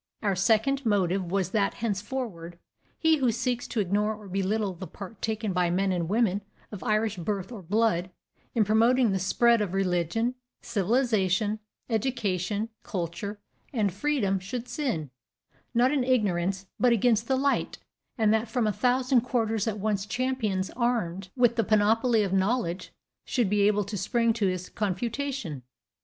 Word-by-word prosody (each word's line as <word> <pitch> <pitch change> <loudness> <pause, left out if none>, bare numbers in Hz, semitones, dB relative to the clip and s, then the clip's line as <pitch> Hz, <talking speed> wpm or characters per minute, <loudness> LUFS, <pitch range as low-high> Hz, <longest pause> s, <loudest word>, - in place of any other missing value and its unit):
Our 200 -2 +1
second 225 +8 +2
motive 190 -5 +1
was 190 -2 0
that 200 -2 +1
henceforward 205 -6 -4 0.4
he 320 -1 +3
who 255 -4 +2
seeks 245 +1 -2
to 230 - -2
ignore 210 +2 +1
or 210 -1 -12
belittle 195 +2 -1
the 180 +1 -8
part 195 +5 -10
taken 220 -2 -1
by 180 -1 +2
men 190 +2 +1
and 175 -2 -1
women 205 -2 +2 0.3
of 205 - -7
Irish 215 -1 +1
birth 195 +3 -3
or 225 -5 -7
blood 185 -1 +1 0.5
in 220 -3 +4
promoting 230 +3 +4
the 190 - 0
spread 235 +5 +3
of 195 -3 -2
religion, 190 +5 0 0.3
civilization, 215 -2 +1 0.3
education, 215 -3 -1
culture, 185 +3 -4 0.3
and 210 -7 0
freedom 200 -4 0
should 230 +6 -5
sin, 215 - -2 0.6
not 245 +3 +4
in 285 -3 +1
ignorance, 195 -6 +1
but 250 -1 +4
against 230 0 +3
the 265 - +2
light, 280 +1 0 0.4
and 220 -2 +3
that 220 +1 0
from 235 0 0
a 210 - +1
thousand 255 +2 +2
quarters 225 -3 0
at 215 -1 -1
once 205 -1 -1
champions 235 -7 -1
armed 205 -7 -1
with 240 -2 +3
the 225 - +3
panoply 220 +2 +3
of 195 -2 -2
knowledge 190 -2 0 0.3
should 235 -7 0
be 205 -1 +4
able 210 0 +2
to 205 +2 -5
spring 230 +5 +1
to 220 -3 0
his 185 -1 -2
confutation. 230 - -3
215 Hz, 155 wpm, -27 LUFS, 190-235 Hz, 0.6 s, in